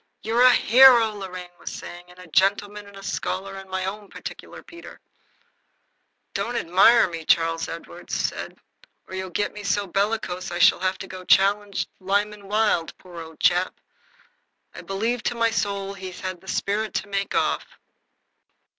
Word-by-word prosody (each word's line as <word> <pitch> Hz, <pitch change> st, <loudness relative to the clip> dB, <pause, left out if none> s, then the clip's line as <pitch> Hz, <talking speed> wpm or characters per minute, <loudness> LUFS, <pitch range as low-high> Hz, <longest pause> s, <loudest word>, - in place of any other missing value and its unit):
"You're 225 Hz, +3 st, +1 dB
a 255 Hz, -, +9 dB
hero," 240 Hz, -1 st, +7 dB
Lorraine 185 Hz, -3 st, -8 dB
was -, -, -6 dB
saying, 175 Hz, 0 st, -9 dB
"and 180 Hz, -, -17 dB
a 180 Hz, -, -12 dB
gentleman 200 Hz, +4 st, +1 dB
and 200 Hz, -1 st, -13 dB
a 195 Hz, -, -11 dB
scholar 195 Hz, 0 st, -3 dB
and 195 Hz, 0 st, -10 dB
my 190 Hz, 0 st, -2 dB
own 200 Hz, +1 st, -6 dB
particular -, -, -9 dB
Peter." 340 Hz, 0 st, -13 dB, 1.3 s
"Don't 245 Hz, -, -2 dB
admire 195 Hz, +4 st, +5 dB
me," 165 Hz, -2 st, -6 dB
said 160 Hz, -, -13 dB
Charles 165 Hz, 0 st, +2 dB
Edward, 170 Hz, +1 st, -9 dB, 1.0 s
"or -, -, -11 dB
you'll 190 Hz, 0 st, -4 dB
get 205 Hz, +4 st, -2 dB
me 210 Hz, -, -8 dB
so 200 Hz, 0 st, 0 dB
bellicose 195 Hz, -1 st, -2 dB
I -, -, -4 dB
shall -, -, +5 dB
have 185 Hz, +1 st, -1 dB
to 185 Hz, -1 st, -9 dB
challenge 200 Hz, +1 st, +3 dB
Lyman 200 Hz, +1 st, -1 dB
Wilde. 210 Hz, -5 st, +1 dB
Poor 175 Hz, -2 st, -10 dB
old 160 Hz, -1 st, -12 dB
chap! 180 Hz, +1 st, +2 dB, 0.9 s
I -, -, -9 dB
believe 225 Hz, +5 st, -2 dB
to 240 Hz, -, -2 dB
my 230 Hz, -1 st, +2 dB
soul 200 Hz, -3 st, -2 dB
he's 190 Hz, -2 st, -8 dB
had 185 Hz, -1 st, -5 dB
the 190 Hz, -, -18 dB
spirit 210 Hz, +3 st, -2 dB
to -, -, -2 dB
make 200 Hz, 0 st, -2 dB
off." -, -, -1 dB
195 Hz, 165 wpm, -24 LUFS, 185-210 Hz, 1.3 s, a